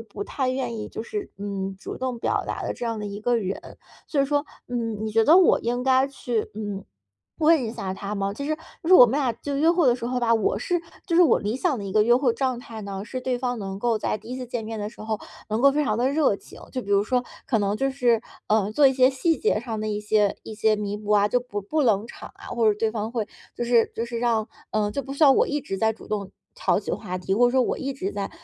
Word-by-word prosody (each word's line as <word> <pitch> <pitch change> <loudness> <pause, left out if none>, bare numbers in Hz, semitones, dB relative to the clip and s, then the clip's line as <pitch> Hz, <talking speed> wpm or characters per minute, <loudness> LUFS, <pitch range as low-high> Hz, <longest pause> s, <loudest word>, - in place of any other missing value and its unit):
不 205 -2 -7
太 260 -2 -2
愿 255 -3 -2
意 210 - -5
就 - - -6
是， 410 - -5
嗯， 195 -1 -4
主 - - -7
动 255 -2 -3
表 - - 0
达 - - -3
的 - - -2
这 240 - -6
样 225 -1 -2
的 210 - -5
一 205 0 -6
个 240 +2 +2
人。 195 -3 -2 0.5
所 290 - 0
以 275 - +4
说， 290 +1 0 0.2
嗯， 230 -3 -3
你 215 - -2
觉 225 +1 +4
得 325 +4 +7
我 375 - +5
应 245 +1 -1
该 260 +1 +4
去， 245 -5 -2
嗯， 205 -2 -4 0.6
问 315 -3 +4
一 225 - -2
下 195 -5 -4
他 200 +2 -5
吗？ 200 -1 -1
其 280 +7 -6
实 310 +1 0 0.3
就 330 - -4
是 370 - +8
我 250 - +11
们 265 +6 0
俩 260 -4 +1
就 280 +3 -4
约 315 +4 +4
会 340 -4 +3
的 245 - +5
时 240 -1 -5
候 250 0 -1
吧， 235 -1 +2
我 205 -2 +1
是 350 +9 -1 0.3
就 340 - -1
是 345 - +6
我 330 - +5
理 215 +4 -2
想 305 -1 +1
的 200 - -5
一 190 - -5
个 215 - +5
约 240 +3 +5
会 255 -3 +2
状 255 -1 -1
态 230 -2 -9
呢， 200 0 -5
是 255 +3 -5
对 250 -1 -1
方 245 -1 -2
能 195 -1 -5
够 230 -1 +1
在 210 - -1
第 220 +2 -14
一 255 - -3
次 255 - -5
见 240 -2 -4
面 220 0 -5
的 205 - -3
时 225 - -15
候， 215 -1 -2 0.3
能 220 +2 0
够 280 - +7
非 295 +1 +1
常 215 -1 0
地 250 - +2
热 280 -7 +2
情， - - -15
就 255 - -2
比 200 - -8
如 200 0 +4
说 250 +2 +1 0.2
可 230 - +2
能 205 0 0
就 270 +4 0
是， 245 -4 +2 0.2
呃， 210 -1 +2
做 285 +3 +5
一 265 - +5
些 255 0 +5
细 320 +5 +1
节 420 - +1
上 225 -3 -4
的 215 - -2
一 210 -1 -2
些 210 -1 +2
一 220 - -8
些 215 0 +3
弥 205 -1 -3
补 210 0 -7
啊， 205 0 +4
就 250 - +2
不 240 -4 -5
不 300 +10 0
冷 220 -3 +2
场 - - -10
啊， - - -13
或 230 -2 +2
者 205 - -1
对 225 - +1
方 220 0 -3
会 225 -4 -1 0.3
就 240 - -3
是 235 -1 +3
就 230 - -2
是 235 0 -4
让， 230 -2 +1 0.2
嗯， 210 -1 0
就 280 - -2
不 275 - -7
需 280 - -2
要 275 - +8
我 - - +3
一 295 0 -1
直 195 - -4
在 220 +1 +2
主 - - -14
动 200 -2 -3 0.2
挑 - - +1
起 - - -5
话 180 0 -4
题， 190 +2 -1
或 245 +3 +5
者 - - +2
说 260 -1 +4
我 - - -1
一 275 +1 -3
直 200 -7 -4
在， 200 -1 -3
230 Hz, 310 characters per minute, -25 LUFS, 210-260 Hz, 0.6 s, 我